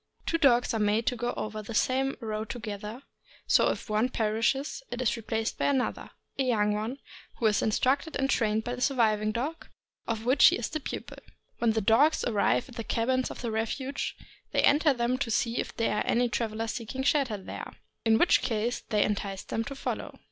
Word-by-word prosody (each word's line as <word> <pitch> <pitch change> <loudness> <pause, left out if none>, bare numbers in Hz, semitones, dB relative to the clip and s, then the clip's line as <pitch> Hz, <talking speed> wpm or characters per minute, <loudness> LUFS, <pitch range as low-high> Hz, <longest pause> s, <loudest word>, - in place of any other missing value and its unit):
Two 330 - 0
dogs 245 -6 +4
are 225 - 0
made 210 +2 +2
to 250 - +1
go 240 +1 -2
over 215 0 -4
the 220 +2 -7
same 265 +3 +1
road 215 -1 -4
together, 215 +1 -6 0.4
so - - +4
if - - -4
one 215 +4 +1
perishes 230 - 0
it 245 - -5
is 255 -3 +1
replaced 225 0 -3
by - - +1
another 270 -3 -1 0.2
— - - -37
a - - +3
young 210 -5 +2
one, 220 +5 -3 0.4
who 235 - -3
is 215 -1 +3
instructed 265 +8 +1
and 270 - +1
trained 220 -4 +1
by 245 - -3
the 250 - -6
surviving 215 -5 +2
dog, 275 +9 -4 0.4
of 225 -1 -2
which 260 +3 +7
he - - +5
is 235 - -3
the 310 - -3
pupil. 275 - -6 0.4
AVhen 225 -2 +3
the 220 - +2
dogs 235 +10 +4
arrive 220 +1 +1
at 250 - -13
the 230 - -3
cabins 255 +4 0
of - - -8
refuge, 235 +4 -2 0.4
they - - +3
enter 295 +1 +5
them 250 0 0
to 265 - -1
see 230 +1 0
if - - -4
there 225 -2 +1
are - - -1
any 245 +1 +3
travelers 225 -1 -2
seeking 255 +3 -4
shelter 270 -6 +2
there, 190 - -7 0.3
in 225 -1 +4
which 345 - +4
case 230 +1 -1
they 210 -2 +3
entice 200 -2 -2
them 225 - -2
to 275 +3 -7
follow. - - -5
230 Hz, 205 wpm, -28 LUFS, 215-260 Hz, 0.4 s, which